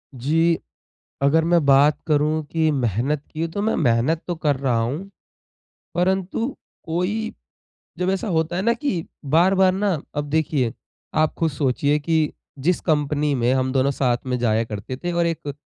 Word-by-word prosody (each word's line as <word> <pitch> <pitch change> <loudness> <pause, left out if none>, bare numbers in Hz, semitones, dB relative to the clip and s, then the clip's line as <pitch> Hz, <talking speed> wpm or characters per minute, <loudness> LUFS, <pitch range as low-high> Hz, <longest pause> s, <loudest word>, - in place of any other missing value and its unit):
जी, 165 +6 +2 0.6
अगर 160 +3 +4
मैं 170 -2 +3
बात 140 +2 +5
करूँ 155 0 +2
कि 160 -1 +2
मेहनत 130 +3 0
की 165 +1 -2
तो 200 +5 -3
मैं 220 - +1
मेहनत 130 +4 +2
तो 175 - -2
कर 150 -3 +1
रहा 130 -3 0
हूँ। 150 +13 -3 0.8
परंतु 190 +6 0 0.4
कोई 185 +7 -2 0.7
जब 180 +1 +1
ऐसा 195 +3 -2
होता 165 -1 0
है 185 - 0
ना 235 +2 +3
कि 235 - -2 0.2
बार-बार 185 +6 +4
ना 200 +1 0 0.2
अब 145 - 0
देखिए, 145 -6 +1 0.4
आप 155 0 +2
खुद 165 -1 +1
सोचिए 140 +1 +1
कि 160 0 +1 0.3
जिस 170 +6 +1
कंपनी 150 -2 +1
में 120 0 +1
हम 130 0 0
दोनों 135 0 +2
साथ 125 -3 +1
में 125 -1 -1
जाया 115 -1 +1
करते 110 +3 -6
थे 175 +5 -4
और 170 0 +1
एक 150 -4 -3
155 Hz, 165 wpm, -22 LUFS, 135-175 Hz, 0.8 s, बात